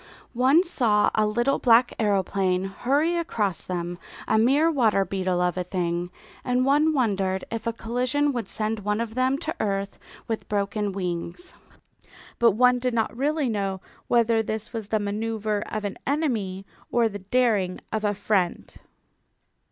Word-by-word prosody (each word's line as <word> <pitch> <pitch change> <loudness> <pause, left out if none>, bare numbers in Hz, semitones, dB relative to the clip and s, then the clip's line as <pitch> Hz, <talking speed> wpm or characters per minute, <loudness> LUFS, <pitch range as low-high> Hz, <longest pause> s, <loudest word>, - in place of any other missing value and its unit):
One 265 +8 +4
saw 225 - +2
a 215 -1 +2
little 240 +6 +1
black 240 0 +4
aeroplane 195 -3 +1
hurry 275 - 0
across 215 - -1
them, 175 -1 -4 0.3
a 220 - +3
mere 285 +8 +4
water 220 -9 +2
beetle 185 -1 -1
of 180 0 0
a 180 - 0
thing, 175 -1 -2 0.3
and 250 0 +1
one 295 +3 +4
wondered 195 -9 0
if 230 0 -4
a - - +2
collision 250 +6 0
would 230 -5 -3
send 215 0 -2
one 210 +1 -1
of 230 -1 -3
them 255 +2 +1
to 320 +1 -4
earth 200 -1 -2 0.3
with 225 -1 -4
broken 205 0 -1
wings. 180 - -4 0.9
But 230 -3 +5
one 250 +3 +4
did 250 -1 -1
not 225 0 0
really 290 +2 0
know 195 -4 -2 0.3
whether 230 -1 +3
this 220 +1 -4
was 220 -3 -5
the 215 - +1
manoeuvre 210 0 -2
of 215 -1 -3
an 200 - -5
enemy 225 -11 -1 0.3
or 235 -1 +3
the 205 -2 -6
daring 200 -3 +1
of 220 -1 -1
a 205 -1 +1
friend. 195 -3 -1
220 Hz, 160 wpm, -25 LUFS, 195-250 Hz, 0.9 s, But